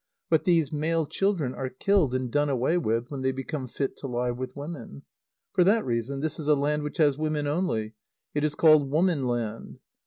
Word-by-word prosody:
But 160 - +3
these 165 -5 +2
male 160 +2 0
children 160 -4 0
are 130 - -4
killed 155 -1 +1
and 130 -2 -2
done 145 +2 +2
away 135 +5 +1
with 115 -7 -1
when 140 -2 -4
they 130 0 +1
become 135 +1 -5
fit 135 +3 -3
to 140 - -6
lie 125 -1 -1
with 125 +1 -6
women. 140 - -8 0.5
For 180 - +4
that 215 +5 +3
reason, 125 +3 -2
this 155 +1 -2
is 150 - -4
a 150 - +5
land 150 +2 0
which 150 0 -5
has 145 -3 +3
women 155 -1 -1
only. 145 -9 -1 0.4
It 145 - -1
is 150 -1 0
called 155 -4 +5
woman 155 -3 +1
land. 115 -2 -3
145 Hz, 205 wpm, -27 LUFS, 130-155 Hz, 0.5 s, a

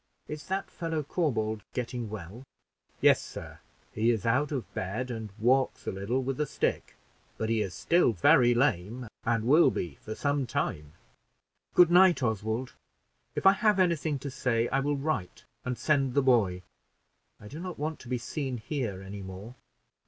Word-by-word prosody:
Is 150 0 -7
that 195 +1 -3
fellow, 165 -3 -3
Corbould, 115 -9 -1
getting 120 -2 -3
well?" 105 +2 -8 0.6
"Yes, - - +5
sir; - - -9 0.3
he 110 +2 +2
is 115 -3 0
out 130 +6 +2
of 115 -9 -4
bed, 110 +7 -3
and 110 -2 -5
walks 130 +4 +2
a - - -1
little 100 +7 -2
with 135 +1 -3
a 150 - 0
stick; - - -2 0.4
but 110 - -2
he 115 -1 +2
is 95 -4 -3
still 170 -7 +3
very 120 +5 +5
lame, 120 -1 0 0.2
and 115 -2 +1
will 150 +8 +6
be 80 -6 -4
for 110 - -6
some 145 -2 0
time." 75 -8 -3 0.8
"Good 175 -1 +7
night, 180 -4 +6
Oswald; 110 +2 -1 0.6
if - - -3
I 195 - +10
have 210 0 +2
any 180 -3 +4
thing 150 -1 -2
to 140 - -3
say, 120 -3 0
I 135 - +1
will 145 +1 0
write 135 - -3 0.2
and 125 -1 -3
send 135 -1 +1
the 140 - +4
boy. 100 -9 +3 0.8
I 105 - -11
do 145 +9 -8
not 180 0 -6
want 155 +2 -3
to - - -13
be 125 0 -1
seen 130 +1 -4
here 110 -6 -4
any 100 +1 -7
more." 95 +5 -8
125 Hz, 175 wpm, -29 LUFS, 110-145 Hz, 0.8 s, I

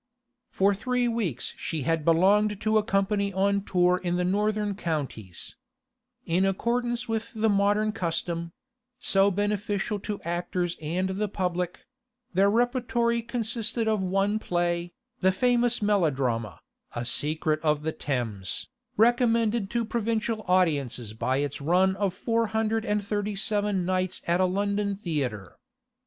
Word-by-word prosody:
For 200 +1 +2
three 245 +4 0
weeks 205 - -2
she 160 -4 -3
had 165 +2 0
belonged 195 +6 +3
to 215 0 +3
a - - -1
company 200 0 +1
on 200 +1 +1
tour 180 -1 +2
in 175 -1 0
the 180 0 0
northern 210 +2 0
counties. 145 - -4 0.7
In 180 +1 +1
accordance 240 +5 0
with 225 0 -2
the 220 0 +2
modern 205 +1 +2
custom—so 195 +5 -1
beneficial 205 +1 -1
to 205 +1 -4
actors 175 +1 -2
and 175 +5 -1
the 200 +3 -1
public—their 200 +4 -2
repertory 235 0 +1
consisted 230 -1 -1
of 215 -2 +1
one 195 +3 +1
play, 175 -2 -1 0.3
the 190 0 +4
famous 245 +2 +2
melodrama, 135 - 0 0.3
'A 120 0 -3
Secret 155 +4 +1
of 150 -1 +1
the 160 - -1
Thames,' 115 -11 -3 0.3
recommended 230 -2 +3
to 235 0 -1
provincial 225 -1 -1
audiences 145 - +1
by 130 +4 0
its 145 0 -2
run 185 +5 +3
of 195 -3 -1
four 230 +3 0
hundred 220 +1 0
and 210 0 0
thirty 205 0 -2
seven 205 -2 +1
nights 185 0 -1
at 175 +2 +2
a - - +5
London 200 +2 0
theatre. 140 - -3
200 Hz, 135 wpm, -27 LUFS, 175-220 Hz, 0.7 s, a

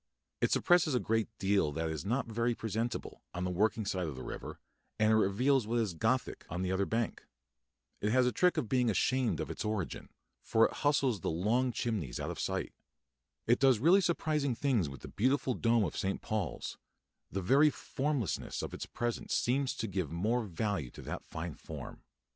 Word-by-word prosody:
It - - +3
suppresses 175 -6 +4
a - - +3
great 110 -1 0
deal 95 -6 +2
that 80 +1 -2
is 80 -1 -4
not 120 +8 0
very 115 +1 0
presentable, 115 +2 -3
on 90 - -2
the 90 - -1
working 105 +4 +1
side 95 -3 -1
of 75 - -5
the 65 - -7
river, - - -7 0.4
and 110 0 +4
it - - +5
reveals 110 +4 +3
what 120 +2 0
is 110 -6 0
Gothic 80 - 0
on 90 +2 -3
the 90 - -1
other 95 +1 +1
bank. 115 0 -2 0.7
It 105 - +1
has 130 +1 +4
a 125 - +2
trick 180 +5 +3
of - - 0
being 125 +1 +2
ashamed 130 +3 +1
of - - -3
its - - -4
origin, 105 -4 -3 0.3
for 115 0 +4
it - - -1
hustles 140 -6 +2
the - - -2
long 110 +10 +1
chimneys 105 - -2
out - - -3
of - - -7
sight. - - -2 0.7
It 120 +2 +3
does 135 -3 +5
really 170 - +5
surprising 155 -7 0
things 115 - +1
with 70 - -10
the - - -8
beautiful 130 +4 +1
dome 115 -2 +2
of 85 - -2
St. 95 -1 -1
Paul's; 110 -3 -3 0.5
the 95 0 -2
very 140 +10 +6
formlessness 135 - -2
of - - -5
its - - -5
presence 120 -1 -2
seems 130 +2 +1
to 115 - -3
give 95 -6 -2
more 110 +9 +1
value 90 - -2
to - - -11
that - - -5
fine 80 0 -5
form. - - -9
110 Hz, 195 wpm, -32 LUFS, 95-130 Hz, 0.7 s, very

